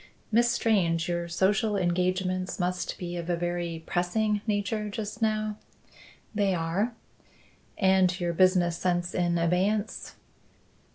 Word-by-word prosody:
"Miss 235 +2 +4
Strange, 180 -9 +1
your 175 -1 -2
social 200 +5 +1
engagements 185 +1 0
must 180 0 -2
be 175 -1 -5
of 170 0 -5
a 175 - +2
very 170 -1 -3
pressing 205 +4 0
nature 210 +1 -1
just 210 +2 -5
now?" 215 -1 0 0.8
"They 200 -3 +1
are." 180 +8 -1 0.8
"And 190 -2 +3
your 175 -1 -1
business 180 -1 +3
sense 175 0 0
in 175 -1 +1
abeyance?" 190 +6 0
185 Hz, 120 wpm, -28 LUFS, 175-210 Hz, 0.8 s, Miss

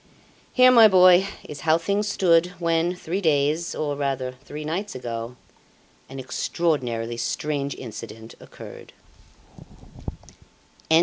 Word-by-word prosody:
Here, 255 0 +6
my 230 -3 +8
boy, 185 -1 +6 0.2
is 150 - -8
how 160 +1 +2
things 200 +5 -1
stood 175 -4 +3
when, 170 +1 0
three 180 +2 -4
days, 155 0 0
or 145 -2 -2
rather 135 -3 -3
three 150 +1 -8
nights 185 +5 -4
ago, 120 -1 -6 0.7
an 135 - -9
extraordinarily 125 -5 -2
strange 140 +2 -3
incident 110 -1 -10
occurred." - - -13
155 Hz, 110 wpm, -23 LUFS, 130-180 Hz, 0.7 s, my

